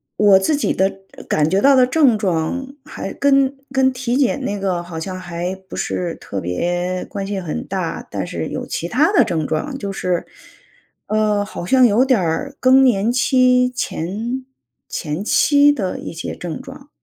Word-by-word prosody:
我 200 -2 +5
自 240 +10 +1
己 285 - 0
的 190 +1 +2 0.4
感 150 0 +1
觉 195 - +2
到 275 +3 +5
的 255 -1 +6
症 255 -5 +3
状 205 +8 -2
还 - - -6
跟 275 -1 +3 0.2
跟 265 0 +3
体 250 -1 -2
检 275 0 +1
那 205 - -2
个 185 -3 -1
好 175 -2 -8
像 185 +3 -5
还 175 0 -4
不 - - -8
是 175 -2 -2
特 100 - -6
别 175 - -2
关 195 -1 -5
系 200 -2 -3
很 150 - -4
大， - - -4
但 - - -3
是 - - -4
有 - - -5
其 170 - -4
它 300 - +2
的 405 - +4
症 160 -4 -1
状。 270 - -3
就 200 -4 -4
是， 180 -2 -2 0.8
呃， 210 -1 +1
好 190 -3 -7
像 255 +4 +5
有 235 +4 +4
点 255 -3 +3
儿 175 - -2
更 260 +1 +6
年 225 -1 +2
期 250 0 +3
前 240 +3 -4 0.4
前 155 +4 -4
期 285 +6 +4
的 190 -8 -3
一 - - -7
些 165 - -5
症 175 +7 -6
状。 275 +2 -12
205 Hz, 195 characters per minute, -19 LUFS, 175-260 Hz, 0.8 s, 的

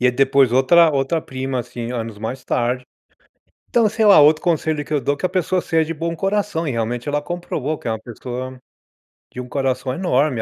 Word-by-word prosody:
E 125 - +3
é 125 - +5
depois 135 -1 +3
outra 160 +6 +5
outra 140 +3 0
prima, 130 -2 -4
assim, 120 0 -5
anos 115 -3 -5
mais 125 +4 -5
tarde. 125 +1 -1 0.8
Então, 230 -2 +3
sei 220 +1 0
lá, 200 -6 +8
outro 155 +2 +5
conselho 160 -3 0
que 155 - -8
eu 150 - +2
dou 140 +3 0
é - - -14
que - - 0
a - - -2
pessoa 185 0 0
seja 165 -1 0
bom 165 +2 -3
coração, 195 -2 -1
e 140 - -1
realmente 120 +2 -3
ela 145 0 0
comprovou 155 -3 -4
que - - -12
é - - 0
uma 110 - -4
pessoa 125 +3 -7 0.8
de - - -7
um 125 - -6
coração 130 -1 -1
enorme, 140 -6 +1
140 Hz, 215 wpm, -20 LUFS, 125-165 Hz, 0.8 s, lá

